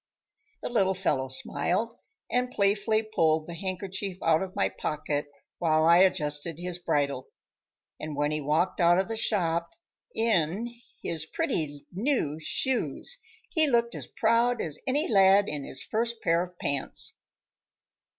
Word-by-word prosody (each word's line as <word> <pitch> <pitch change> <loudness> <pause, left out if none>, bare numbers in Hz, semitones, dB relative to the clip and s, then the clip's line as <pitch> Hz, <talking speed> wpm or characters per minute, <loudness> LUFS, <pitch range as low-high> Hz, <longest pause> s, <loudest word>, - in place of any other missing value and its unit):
The - - -2
little 190 -5 +2
fellow 145 -8 0
smiled, 185 - -1 0.4
and 250 +1 +1
playfully 210 0 +1
pulled 160 -8 +1
the 170 - -7
handkerchief 190 +1 -4
out 160 -1 +4
of 190 -1 -5
my - - +2
pocket 145 -1 -3 0.3
while 155 -2 +3
I 170 +1 +7
adjusted 160 -4 +1
his 175 0 -4
bridle. 140 -6 -1 0.7
And 155 -1 -5
when 145 +1 0
he 155 0 -1
walked 160 +6 +1
out 175 +1 +5
of 190 - +1
the 225 - -3
shop 170 -6 0 0.4
"in" 225 +1 +1 0.3
his 160 -1 -2
pretty 145 -3 -2
new 190 - 0
shoes 265 - -1 0.3
he 315 -4 +4
looked 235 -3 +2
as - - -6
proud 235 0 +2
as 155 -2 -2
any 290 +5 +1
lad 195 -1 +5
in 145 -2 -4
his 130 - -6
first 230 +1 -2
pair 170 0 +3
of 180 0 -7
pants. 140 -4 0
180 Hz, 145 wpm, -28 LUFS, 155-220 Hz, 0.7 s, I